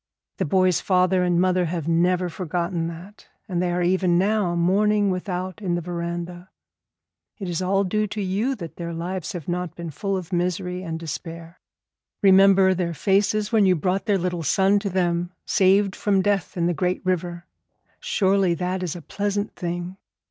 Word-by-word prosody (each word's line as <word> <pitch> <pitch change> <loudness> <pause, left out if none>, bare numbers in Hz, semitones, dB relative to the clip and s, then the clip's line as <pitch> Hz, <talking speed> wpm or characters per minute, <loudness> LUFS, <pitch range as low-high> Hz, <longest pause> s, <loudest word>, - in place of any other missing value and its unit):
The - - 0
boy's 185 +1 +2
father 185 0 +2
and 175 -1 +2
mother 180 0 +2
have 165 -2 -3
never 175 +2 +2
forgotten 170 0 -2
that, 175 +5 -10 0.2
and 180 -4 -1
they 180 -1 0
are 175 0 0
even 180 -1 +2
now 195 -2 +1
mourning 200 +3 +2
without 185 0 -4
in 180 -4 -1
the - - -1
veranda. 175 +1 -5 0.9
It 195 - -6
is 175 0 -2
all 195 +2 +2
due 215 +3 0
to 210 +1 -6
you 205 +7 0
that 170 -7 -9
their 170 -1 -5
lives 175 +2 -4
have 170 -5 -7
not 175 -1 -3
been 170 -2 -6
full 195 +7 -2
of 180 0 -7
misery 180 +1 -1
and 165 -3 -4
despair. 165 +1 -7 0.6
Remember 195 -1 +6
their 170 -2 -2
faces 205 +4 +1
when 215 -4 +4
you 185 - +4
brought 180 +4 -1
their 205 -2 +3
little 180 -1 -2
son 195 +6 +3
to 200 0 -3
them 175 -1 -1
saved 195 0 +3
from 195 -2 +1
death 195 -4 0
in 170 - +1
the 175 - +1
great 180 +2 -1
river. 175 -1 -2 0.5
Surely 195 - +2
that 180 +1 -2
is 180 -3 -3
a 170 - -9
pleasant 205 +3 -2
thing. 175 +1 -4
180 Hz, 175 wpm, -23 LUFS, 175-195 Hz, 0.9 s, Remember